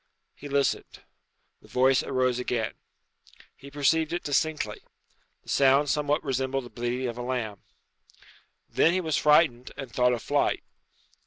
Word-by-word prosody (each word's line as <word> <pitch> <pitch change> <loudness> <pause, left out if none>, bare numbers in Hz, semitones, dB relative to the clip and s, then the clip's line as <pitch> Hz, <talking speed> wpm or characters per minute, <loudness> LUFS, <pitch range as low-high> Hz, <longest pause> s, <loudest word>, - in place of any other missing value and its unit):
He 145 - -10
listened. 140 0 -1 0.6
The - - -18
voice 130 +1 +3
arose 130 -2 0
again. 120 -3 -2 0.8
He 140 - -13
perceived 150 +3 +1
it 175 +1 -3
distinctly. 150 -6 -1 0.6
The - - -15
sound 140 +1 +4
somewhat 150 +1 0
resembled 135 -1 -2
the 120 - -12
bleating 120 +2 -3
of 120 0 -5
a - - -3
lamb. 120 -5 -3 1.1
Then 165 - +3
he 185 - +1
was 160 -4 -1
frightened, 150 -5 +3
and 135 -3 -7
thought 125 0 +2
of 120 - -4
flight. - - 0
135 Hz, 145 wpm, -27 LUFS, 125-145 Hz, 1.1 s, sound